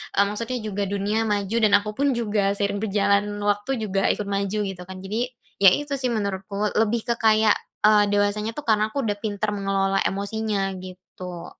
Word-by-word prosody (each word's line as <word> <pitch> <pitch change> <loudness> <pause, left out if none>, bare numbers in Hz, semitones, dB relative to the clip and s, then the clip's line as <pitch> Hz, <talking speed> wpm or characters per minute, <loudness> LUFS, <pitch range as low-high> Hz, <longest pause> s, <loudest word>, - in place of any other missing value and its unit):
eee, 200 - +5
maksudnya 230 +5 -3
juga 205 0 -2
dunia 205 +2 -1
maju 205 +1 -1
dan 215 - +5
aku 210 +1 -6
pun 280 +1 +2
juga 210 -2 0 0.2
seiring 200 0 -1
berjalannya 200 0 +2 0.2
waktu 205 +5 -4 0.2
juga 195 0 0
ikut 210 - -5
maju 200 +1 -1
gitu 180 -2 -8
kan 190 - -7
jadi 210 +3 -3 0.5
ya 195 - +11
itu 290 -1 -5
sih 250 - +1
menurutku 200 -1 -3 0.3
lebih 225 +2 +1
ke 235 - +2
kayak, 215 -1 +5 0.3
eee, 210 -1 +6
dewasanya 205 +2 +1
tuh 295 - -4
karena 215 -1 +3
aku - - -7
udah 205 - 0
pintar 210 0 -1
mengelola 195 -1 0
emosinya 205 +1 -2 0.2
gitu. 180 -1 -9
205 Hz, 180 wpm, -24 LUFS, 195-215 Hz, 0.5 s, ya